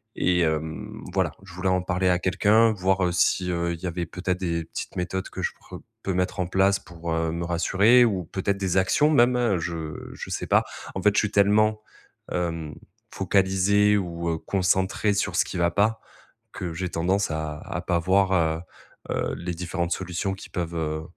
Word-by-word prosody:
Et 90 Hz, 0 st, +2 dB
hem, 80 Hz, -1 st, -2 dB
voilà, -, -, +1 dB
je 95 Hz, -3 st, -13 dB
voulais 95 Hz, +2 st, -1 dB
en 90 Hz, 0 st, +2 dB
parler 90 Hz, 0 st, +1 dB
à 90 Hz, -1 st, +3 dB
quelqu'un, 105 Hz, +5 st, +4 dB
voir, 95 Hz, -1 st, +1 dB
heu, 90 Hz, -, +1 dB
si, 90 Hz, +1 st, +2 dB
heu, 85 Hz, 0 st, -1 dB
il 85 Hz, -, -7 dB
y 95 Hz, -, -3 dB
avait 85 Hz, 0 st, -3 dB
peut-être 90 Hz, +1 st, -3 dB
des 85 Hz, -3 st, -2 dB
petites -, -, -7 dB
méthodes 90 Hz, +1 st, -3 dB
que -, -, -6 dB
je -, -, -1 dB
pourr -, -, -12 dB, 0.2 s
peux 95 Hz, -, -1 dB
mettre 90 Hz, +2 st, -1 dB
en 90 Hz, -, -1 dB
place 95 Hz, +2 st, +3 dB
pour, 85 Hz, -1 st, -6 dB
heu, 80 Hz, 0 st, 0 dB
me 85 Hz, +1 st, -3 dB
rassurer 100 Hz, +8 st, +4 dB
ou 95 Hz, -6 st, -1 dB
peut-être 100 Hz, +4 st, -2 dB
des 95 Hz, -2 st, -1 dB
actions 95 Hz, +11 st, +3 dB
même, 120 Hz, -, +3 dB
je 80 Hz, -2 st, -5 dB
je -, -, -8 dB
sais -, -, -3 dB
pas. -, -, +3 dB, 0.3 s
En 95 Hz, -, -2 dB
fait, 105 Hz, +2 st, +4 dB
je -, -, +5 dB
suis 105 Hz, -, 0 dB
tellement, 105 Hz, +1 st, +3 dB, 0.5 s
hem, 85 Hz, -3 st, -3 dB, 0.4 s
focalisé 95 Hz, +2 st, +3 dB
ou, 85 Hz, -3 st, -3 dB
heu, 80 Hz, -, -1 dB
concentré 95 Hz, +3 st, +1 dB
sur 100 Hz, -2 st, -1 dB
ce -, -, +4 dB
qui -, -, -7 dB
va 85 Hz, 0 st, +2 dB
pas, 110 Hz, +4 st, +1 dB, 0.5 s
que 90 Hz, -2 st, -5 dB
j'ai 90 Hz, +2 st, -3 dB
tendance 95 Hz, +4 st, 0 dB
à 80 Hz, -1 st, -3 dB
à 95 Hz, -1 st, -5 dB
pas 90 Hz, -1 st, +1 dB
voir, 95 Hz, +2 st, +2 dB, 0.8 s
heu, -, -, -1 dB
heu, -, -, -1 dB
les 85 Hz, 0 st, -4 dB
différentes 85 Hz, 0 st, -3 dB
solutions 95 Hz, +1 st, -2 dB
qui 95 Hz, -, -11 dB
peuvent, 85 Hz, -2 st, -3 dB
heu, 80 Hz, -1 st, -2 dB
90 Hz, 200 wpm, -25 LUFS, 85-100 Hz, 0.8 s, je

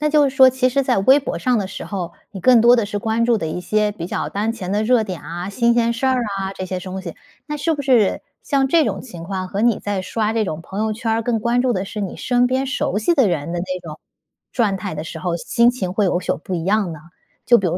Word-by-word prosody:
那 300 Hz, -, +1 dB
就 295 Hz, -2 st, +4 dB
是 265 Hz, -, -8 dB
说 260 Hz, -1 st, +8 dB
其 255 Hz, 0 st, +1 dB
实 275 Hz, +2 st, +1 dB
在 255 Hz, -, +1 dB
微 260 Hz, +8 st, +5 dB
博 275 Hz, -, -4 dB
上 250 Hz, -2 st, +1 dB
的 200 Hz, -, -2 dB
时 190 Hz, -, -7 dB
候， 185 Hz, -4 st, -5 dB, 0.2 s
你 195 Hz, -, -7 dB
更 245 Hz, +2 st, +6 dB
多 240 Hz, +2 st, +6 dB
的 230 Hz, -, +1 dB
是 205 Hz, 0 st, -3 dB
关 225 Hz, +2 st, 0 dB
注 235 Hz, -2 st, +2 dB
的 165 Hz, -, -3 dB
一 160 Hz, +3 st, -4 dB
些 210 Hz, +2 st, 0 dB
比 170 Hz, -5 st, -6 dB
较 -, -, -3 dB
当 210 Hz, +3 st, -1 dB
前 190 Hz, -6 st, -6 dB
的 210 Hz, -, +1 dB
热 230 Hz, 0 st, +3 dB
点 185 Hz, -4 st, -6 dB
啊， 175 Hz, +3 st, -6 dB
新 235 Hz, +3 st, +2 dB
鲜 235 Hz, -1 st, +2 dB
事 235 Hz, +3 st, -2 dB
儿 260 Hz, 0 st, +3 dB, 0.2 s
啊 195 Hz, 0 st, -3 dB
这 185 Hz, -, -5 dB
些 185 Hz, 0 st, -3 dB
东 185 Hz, +1 st, -6 dB
西。 170 Hz, -3 st, -7 dB, 0.3 s
那 300 Hz, -1 st, -4 dB
是 320 Hz, +2 st, 0 dB
不 290 Hz, -, -5 dB
是 245 Hz, -7 st, +3 dB, 0.2 s
像 275 Hz, -2 st, +1 dB
这 325 Hz, +2 st, +4 dB
种 -, -, -2 dB
情 175 Hz, -10 st, -10 dB
况 185 Hz, 0 st, -4 dB
和 200 Hz, +2 st, -3 dB
你 235 Hz, -1 st, +3 dB
在 205 Hz, -2 st, -3 dB
刷 215 Hz, +3 st, -1 dB
这 225 Hz, -1 st, +1 dB
种 155 Hz, -4 st, -4 dB
朋 195 Hz, +3 st, -6 dB
友 220 Hz, 0 st, 0 dB
圈 225 Hz, +1 st, -2 dB
儿 225 Hz, 0 st, 0 dB
更 230 Hz, 0 st, 0 dB
关 240 Hz, +2 st, +1 dB
注 255 Hz, -1 st, +2 dB
的 190 Hz, -2 st, -2 dB
是 210 Hz, +2 st, -6 dB
你 195 Hz, -3 st, -4 dB
身 245 Hz, -1 st, +2 dB
边 260 Hz, +2 st, 0 dB
熟 210 Hz, -6 st, -1 dB
悉 285 Hz, +11 st, +2 dB
的 270 Hz, -7 st, +4 dB
人 170 Hz, -2 st, -2 dB
的 175 Hz, -, -2 dB
那 185 Hz, 0 st, -4 dB
种 160 Hz, -3 st, -9 dB, 0.5 s
状态 195 Hz, -6 st, -1 dB
的 150 Hz, -, -4 dB
时 160 Hz, -, -7 dB
候， 175 Hz, 0 st, -2 dB
心 235 Hz, +7 st, +3 dB
情 195 Hz, -8 st, -4 dB
会 205 Hz, +2 st, +1 dB
有所 180 Hz, -1 st, 0 dB
不 185 Hz, -, -4 dB
一 165 Hz, -2 st, -3 dB
样 200 Hz, -2 st, +1 dB
呢？ 155 Hz, -, -8 dB, 0.5 s
就 240 Hz, 0 st, +6 dB
比 195 Hz, -, -1 dB
如 170 Hz, -, 0 dB
215 Hz, 305 characters per minute, -20 LUFS, 185-245 Hz, 0.5 s, 说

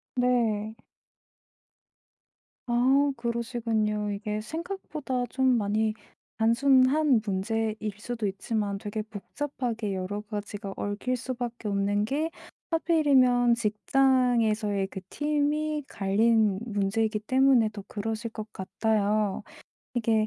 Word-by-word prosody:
네. 225 Hz, -4 st, +1 dB, 1.9 s
아 265 Hz, +4 st, +3 dB
그러시군요. 225 Hz, -3 st, -1 dB
이게 210 Hz, +1 st, -3 dB
생각보다 310 Hz, -, -4 dB
좀 260 Hz, -2 st, +3 dB
많이 215 Hz, +1 st, +1 dB, 0.4 s
단순한 260 Hz, +3 st, +4 dB
문제일 215 Hz, +3 st, -1 dB, 0.2 s
수도 230 Hz, 0 st, -4 dB
있지만 200 Hz, +1 st, -2 dB
되게 210 Hz, +2 st, -4 dB
복잡하게 225 Hz, -1 st, -4 dB
여러 195 Hz, +3 st, -3 dB
가지가 205 Hz, -1 st, -6 dB
얽힐 210 Hz, +5 st, -2 dB
수밖에 240 Hz, -3 st, -5 dB
없는 205 Hz, +1 st, +1 dB
게 300 Hz, +7 st, -1 dB, 0.4 s
하필이면 265 Hz, -8 st, +4 dB
직장에서의 225 Hz, -3 st, +2 dB
그 190 Hz, -, -7 dB
팀이 300 Hz, 0 st, 0 dB
갈린 210 Hz, 0 st, +2 dB
문제이기 215 Hz, +1 st, 0 dB
때문에 255 Hz, 0 st, +4 dB
더 200 Hz, -2 st, -7 dB
그러실 225 Hz, +2 st, -3 dB
것 215 Hz, -1 st, -7 dB
같아요. 210 Hz, 0 st, 0 dB, 0.5 s
이게 220 Hz, -2 st, +2 dB
225 Hz, 230 characters per minute, -27 LUFS, 210-255 Hz, 1.9 s, 단순한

